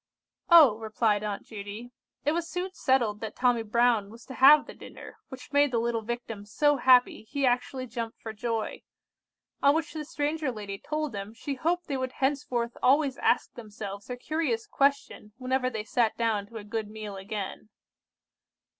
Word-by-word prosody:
"Oh," 300 -11 +8
replied 215 -1 +1
Aunt 205 -1 -3
Judy, 215 +3 -8 0.3
"it 295 - +3
was 335 +1 -2
soon 365 +1 -4
settled 240 - +1
that 220 -1 -6
Tommy 245 -2 +2
Brown 225 -1 +2
was 230 +2 -14
to 260 - -9
have 290 +4 +7
the - - -10
dinner, - - -12
which 260 +1 -11
made 285 0 +5
the 245 - -1
little 230 0 0
Victim 225 -2 -5
so 290 +8 +2
happy, 255 -1 +4
he 275 +5 -2
actually 255 +1 0
jumped 230 -1 -6
for 220 - -7
joy. 225 0 -3 0.8
On 280 +1 +5
which 320 0 -2
the 310 -1 -4
stranger 295 0 -2
lady 205 -3 -7
told 305 -1 -3
them 205 +1 -7
she 280 - -4
hoped 340 +6 -1
they 280 -4 -2
would 260 -1 -3
henceforth 255 -4 -1
always 275 0 +3
ask 245 - +1
themselves 205 -3 -8
her 250 - -4
curious 265 -5 -1
question 275 -6 0
whenever 255 0 0
they 220 -4 -4
sat 225 0 0
down 220 -3 0
to 230 - -9
a 210 - -7
good 215 0 -4
meal 215 -2 -7
again. 200 +1 -6
240 Hz, 175 wpm, -28 LUFS, 215-275 Hz, 0.8 s, Oh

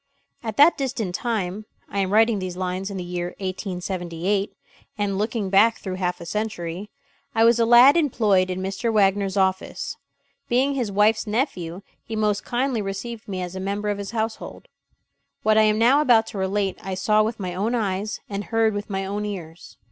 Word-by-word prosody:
At 220 -3 -5
that 295 +3 +6
distant 235 -8 -2
time 210 -1 -2 0.2
I 200 - -3
am 190 -1 0
writing 220 0 +4
these 185 -1 -5
lines 185 +1 -3
in 200 - -5
the 180 - -4
year 175 0 -4
1878, 185 0 -3 0.5
and 200 -2 -1
looking 215 -2 -2
back 220 +4 +5
through 190 - -5
half 180 -1 -2
a 170 - -8
century 200 -1 -4 0.5
I 225 - +4
was 235 +1 +5
a 230 - +3
lad 245 +5 +8
employed 215 - +2
in 185 0 -3
Mr. 195 +5 -2
Wagner's 200 -2 +2
office. 190 0 -1 0.5
Being 260 +4 +2
his 245 -7 -2
wife's 210 +3 +2
nephew, 200 - -2 0.2
he 225 - -6
most 210 -1 0
kindly 245 -1 -1
received 205 +3 -5
me 185 -2 -3
as 180 +1 -6
a - - -4
member 200 +2 -2
of 205 -1 -2
his 200 -1 -5
household. 220 -1 -4 0.7
What 215 0 +4
I 215 0 +5
am 215 - +1
now 250 +6 +5
about 240 -6 +5
to 205 - -6
relate 190 0 -1
I 190 -1 -4
saw 215 +3 +3
with 220 +1 -1
my 180 -2 -4
own 210 +7 -1
eyes 205 -2 -2
and 200 -1 -4
heard 225 +3 +2
with 205 +1 -5
my 195 -1 -2
own 205 +2 -3
ears. 175 -5 -7
205 Hz, 190 wpm, -23 LUFS, 190-225 Hz, 0.7 s, lad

